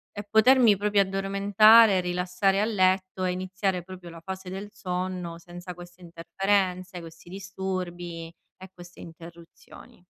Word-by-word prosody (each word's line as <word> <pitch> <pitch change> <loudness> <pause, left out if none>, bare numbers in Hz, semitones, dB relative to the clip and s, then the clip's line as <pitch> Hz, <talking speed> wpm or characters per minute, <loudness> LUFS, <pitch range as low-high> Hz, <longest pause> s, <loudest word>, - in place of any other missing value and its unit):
e 205 - -5
potermi 225 0 +5
proprio 205 0 +2
addormentare, 200 +2 +4
rilassare 180 +2 0
a 215 - +1
letto 185 -3 0
e 185 - 0
iniziare 185 0 -3
proprio 180 -1 -11
la 165 0 -12
fase 190 +2 -8
del 195 +2 -7
sonno 180 -3 -5
senza 175 +1 -10
queste 175 +1 -14
interferenze, 185 +2 -2
questi 165 0 -13
disturbi 180 -3 -6 0.3
e 190 0 -12
queste 175 0 -14
interruzioni. 170 +1 -14
185 Hz, 130 wpm, -26 LUFS, 175-195 Hz, 0.3 s, potermi